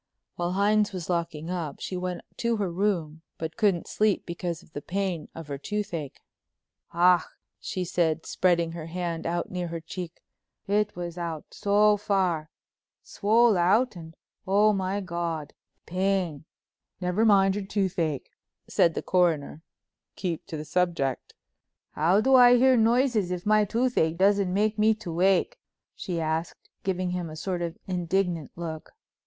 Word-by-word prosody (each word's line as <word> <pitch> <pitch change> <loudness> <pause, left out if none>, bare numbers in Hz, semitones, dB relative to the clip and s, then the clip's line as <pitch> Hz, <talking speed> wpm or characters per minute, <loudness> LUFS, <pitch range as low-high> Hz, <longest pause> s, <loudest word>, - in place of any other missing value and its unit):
While 175 +1 -2
Hines 205 +1 +2
was 180 -2 -4
locking 170 -1 -2
up 165 -6 -4
she 185 - -5
went 180 -1 -3 0.2
to 235 -1 0
her 195 -4 -1
room 170 -5 -1 0.2
but 160 -1 -5
couldn't 200 -6 +2
sleep 210 -2 +1
because 170 0 -4
of - - -23
the 145 - -5
pain 185 -3 -3
of 165 - -7
her 140 -1 -5
toothache. 175 -6 -4 0.7
"Ach," 175 0 +5 0.4
she 185 -1 -3
said, 165 -2 0
spreading 170 -2 +1
her 165 -1 -7
hand 170 -1 -3
out 170 +1 -2
near 180 -1 -3
her 165 0 -4
cheek, 170 +1 -8 0.4
"it 210 +1 +1
was 175 0 -5
out 165 -3 -4
so 210 +1 +3
far—swole 200 +4 0
out, 210 +7 +3
and, 165 -1 -10 0.3
oh, 205 +2 +4
my 195 +1 -1
God—pain!" 170 0 -3 0.5
"Never 180 +4 0
mind 195 -3 +5
your 205 -1 -3
toothache," 180 -8 -1 0.4
said 165 -2 +3
the - - -3
Coroner—"keep 170 0 -2
to 165 -5 -5
the 150 - -6
subject." 170 -7 -1 0.6
"How 175 +7 +3
do 265 +4 +3
I 245 -1 +8
hear 260 +1 +5
noises 230 -3 +3
if 180 -1 -4
my 215 0 +4
toothache 220 -8 +1
doesn't 200 0 +3
make 210 +3 +1
me 220 +1 +4
to 205 -6 -7
wake?" 190 - +2 0.4
she 175 -4 -4
asked, 160 +1 -3
giving 185 -1 -1
him 180 -2 -3
a 155 - -8
sort 180 +2 -3
of 170 0 -4
indignant 180 -3 -1
look. 160 -2 -6
180 Hz, 150 wpm, -27 LUFS, 165-205 Hz, 0.7 s, I